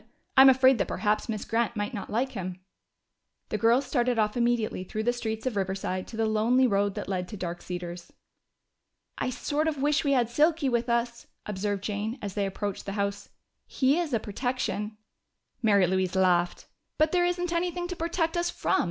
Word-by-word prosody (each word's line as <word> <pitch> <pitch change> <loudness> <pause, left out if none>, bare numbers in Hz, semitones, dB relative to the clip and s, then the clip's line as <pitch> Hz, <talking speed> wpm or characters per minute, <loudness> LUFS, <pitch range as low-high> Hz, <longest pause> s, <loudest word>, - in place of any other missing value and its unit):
"I'm 265 0 +9
afraid 260 -1 +5
that - - +1
perhaps 210 +1 0
Miss 215 -2 -3
Grant 235 +1 0
might 205 +4 -2
not 205 - -5
like 250 +5 0
him." 185 -5 -5 0.9
The 215 - -2
girls 235 +4 +4
started 250 -2 +1
off 210 -1 +1
immediately 235 -5 0
through 215 +3 -4
the 240 +2 +2
streets 220 -2 -4
of 255 -4 -1
Riverside 190 -1 -2
to 225 - -9
the 225 - +2
lonely 225 +4 +3
road 200 -3 +1
that - - -5
led 185 -2 -2
to 210 - -8
Dark 175 -1 -5
Cedars. 175 -1 -6 1.1
"I - - 0
sort 295 +5 -1
of 300 -3 -1
wish 295 +2 +2
we 280 -2 +2
had 245 -3 +3
Silky 295 +3 +2
with 240 0 0
us," 235 0 -1 0.2
observed 205 -1 -2
Jane 210 +4 -3
as 200 -4 -5
they 200 -1 0
approached 200 +1 -4
the 195 - -3
house. 200 0 -2 0.4
"He 275 +5 +2
is 335 -4 -2
a 230 - +2
protection." 215 -1 -3 0.6
Mary 200 -5 +4
Louise 185 0 0
laughed. 180 -2 +2 0.3
"But 310 0 +3
there 355 -1 +3
isn't 355 0 -1
anything 350 +1 -1
to 360 - -3
protect 330 0 -1
us 345 0 +1
from! - - 0
225 Hz, 190 wpm, -27 LUFS, 200-265 Hz, 1.1 s, I'm